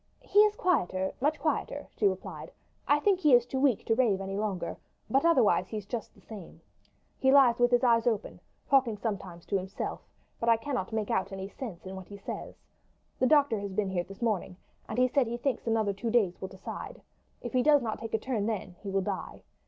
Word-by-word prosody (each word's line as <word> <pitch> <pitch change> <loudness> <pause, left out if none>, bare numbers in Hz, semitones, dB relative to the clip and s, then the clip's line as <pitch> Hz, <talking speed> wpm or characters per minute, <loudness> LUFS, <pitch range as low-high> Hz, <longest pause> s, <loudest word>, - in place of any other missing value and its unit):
"He 415 -4 +3
is 420 0 +6
quieter, 190 - 0
much 295 +3 +1
quieter," 310 - -2
she 415 - +3
replied. - - -4 0.4
"I 290 +1 +4
think 385 +3 +2
he 300 -8 +6
is 240 -1 +4
too 265 +2 -3
weak 265 -6 +2
to 225 - +2
rave 225 -5 +2
any 195 0 -4
longer; 195 -5 -3 0.3
but 270 +3 +3
otherwise 225 - +4
he's 210 -2 -5
just 230 +1 -6
the - - -20
same. 200 -7 -11 0.6
He 265 - +4
lies 260 -4 +6
with 245 0 +4
his 245 0 +3
eyes 230 -1 +4
open, 220 -3 -1 0.3
talking 255 -6 +3
sometimes 190 -6 -5
to 200 - 0
himself, 190 +1 -5 0.4
but 230 - 0
I 230 - +6
cannot 240 -4 -3
make 220 -2 -2
out 190 +1 0
any 190 0 -5
sense 205 -8 -8
in 190 +1 -7
what 190 -1 -9
he 200 - -10
says. 200 - -7 0.6
The 255 - +3
doctor 280 -6 +4
has 200 -1 -5
been 195 -1 -1
here 175 -2 0
this 195 +5 -10
morning, 200 -5 -1 0.3
and 220 - -4
he 255 0 +4
says - - -14
that 270 -4 +3
he 235 +1 -3
thinks 245 -1 -2
another 220 -3 +1
two 215 +4 -4
days 215 -6 +1
will 190 - -3
decide. 190 0 -8 0.4
If 240 - -5
he 255 - +3
does 290 0 +5
not 220 -2 -3
take 225 -1 -3
a - - +3
turn 220 -3 -2
then 190 -5 -4
he 200 - -7
will 195 0 +1
die. 195 -1 -5
225 Hz, 225 wpm, -29 LUFS, 195-255 Hz, 0.6 s, is